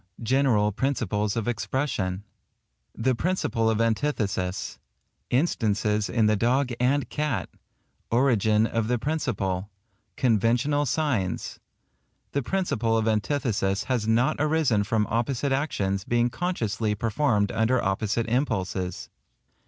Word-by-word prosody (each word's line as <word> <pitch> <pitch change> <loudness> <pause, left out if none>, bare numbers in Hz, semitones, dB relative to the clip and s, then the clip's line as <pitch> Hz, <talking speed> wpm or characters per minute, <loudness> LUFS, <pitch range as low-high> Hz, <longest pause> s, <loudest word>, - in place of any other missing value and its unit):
GENERAL 115 -4 +2
PRINCIPLES 105 -4 -1
OF 115 -1 -2
EXPRESSION—continued. 110 -6 -2 0.8
The 130 - +4
Principle 125 -7 0
of 110 -1 0
Antithesis—Instances 110 - -1
in 115 -3 +2
the 105 0 +4
dog 125 +5 +1
and 135 +3 +2
cat—Origin 120 -6 -1
of 115 -1 -1
the 125 +1 +1
principle—Conventional 115 - -1
signs—The 140 - -4
principle 120 - 0
of 110 0 0
antithesis 110 -3 0
has 120 -5 -1
not 115 +3 +2
arisen 150 -8 +2
from 110 0 +1
opposite 120 +4 -1
actions 100 -9 -1
being 120 +2 +1
consciously 115 - -1
performed 110 -1 +1
under 110 +4 +2
opposite 110 +3 0
impulses. 95 -8 -2
115 Hz, 100 wpm, -26 LUFS, 105-130 Hz, 0.8 s, The